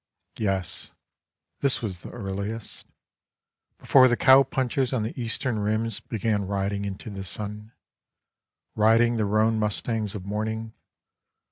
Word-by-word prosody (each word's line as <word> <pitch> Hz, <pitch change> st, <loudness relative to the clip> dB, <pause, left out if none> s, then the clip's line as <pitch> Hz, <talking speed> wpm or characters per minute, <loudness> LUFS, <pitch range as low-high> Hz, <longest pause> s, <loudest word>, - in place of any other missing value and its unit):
Yes, 95 Hz, -5 st, -1 dB, 0.7 s
this 135 Hz, -3 st, +2 dB
was 95 Hz, -5 st, -2 dB
the -, -, -10 dB
earliest 100 Hz, +1 st, -5 dB, 0.4 s
— -, -, -57 dB
Before 130 Hz, -2 st, +6 dB
the 120 Hz, -1 st, +1 dB
cowpunchers 130 Hz, -1 st, +4 dB
on 120 Hz, -4 st, 0 dB
the 110 Hz, -, -3 dB
eastern 115 Hz, 0 st, -2 dB
rims 110 Hz, +1 st, 0 dB
Began 105 Hz, -3 st, -1 dB
riding 100 Hz, +1 st, -1 dB
into 100 Hz, +2 st, -6 dB
the 95 Hz, -1 st, -6 dB
sun, 105 Hz, +3 st, -6 dB, 1.0 s
Riding 115 Hz, +2 st, +4 dB
the 110 Hz, -, +1 dB
roan 110 Hz, +2 st, +2 dB
mustangs 105 Hz, 0 st, -1 dB
of 95 Hz, -3 st, -6 dB
morning. 110 Hz, +2 st, -3 dB
110 Hz, 125 wpm, -26 LUFS, 100-115 Hz, 1.0 s, Before